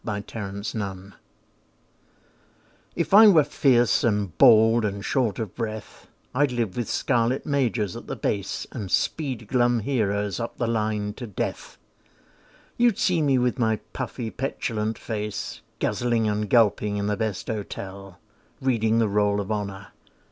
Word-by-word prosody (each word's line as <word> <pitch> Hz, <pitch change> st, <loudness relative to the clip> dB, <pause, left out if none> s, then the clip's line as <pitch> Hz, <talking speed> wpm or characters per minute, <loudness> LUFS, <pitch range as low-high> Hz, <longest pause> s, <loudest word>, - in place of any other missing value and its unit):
BASE 105 Hz, -2 st, -3 dB
DETAILS 100 Hz, -2 st, -5 dB, 1.8 s
If 170 Hz, +2 st, -2 dB
I 215 Hz, +2 st, +10 dB
were 165 Hz, -7 st, +7 dB
fierce, 120 Hz, -6 st, +3 dB
and 105 Hz, -6 st, 0 dB
bald, 110 Hz, +1 st, +6 dB
and 100 Hz, 0 st, -3 dB
short 125 Hz, -7 st, 0 dB
of 110 Hz, -4 st, -4 dB
breath, 110 Hz, -2 st, -6 dB, 0.3 s
I'd 140 Hz, +1 st, +2 dB
live 115 Hz, -6 st, -2 dB
with 120 Hz, -2 st, -3 dB
scarlet 120 Hz, 0 st, 0 dB
Majors 120 Hz, -9 st, 0 dB
at -, -, -9 dB
the -, -, -4 dB
Base, 100 Hz, -2 st, -2 dB
And 105 Hz, -6 st, -6 dB
speed 130 Hz, -, -1 dB
glum 120 Hz, -1 st, +2 dB
heroes 105 Hz, -5 st, -1 dB
up 115 Hz, -, -5 dB
the 120 Hz, -, -1 dB
line 105 Hz, -2 st, -1 dB
to 120 Hz, -, -6 dB
death. 100 Hz, -, -5 dB, 1.0 s
You'd 240 Hz, -4 st, +3 dB
see 175 Hz, -3 st, +2 dB
me 140 Hz, -3 st, +3 dB
with 125 Hz, +1 st, 0 dB
my 110 Hz, -2 st, +2 dB, 0.2 s
puffy 125 Hz, -3 st, -4 dB
petulant 110 Hz, -4 st, -3 dB
face, 105 Hz, -2 st, -5 dB, 0.2 s
Guzzling 120 Hz, -2 st, 0 dB
and 105 Hz, 0 st, -1 dB
gulping 105 Hz, -3 st, +3 dB
in 100 Hz, -, -1 dB
the 105 Hz, 0 st, 0 dB
best 110 Hz, -2 st, -3 dB
hotel, 100 Hz, -3 st, -6 dB, 0.4 s
Reading 115 Hz, -5 st, +1 dB
the 115 Hz, -1 st, +3 dB
Roll 105 Hz, 0 st, +1 dB
of 100 Hz, +1 st, -4 dB
Honour. 100 Hz, -2 st, -4 dB
110 Hz, 145 wpm, -25 LUFS, 105-120 Hz, 1.8 s, I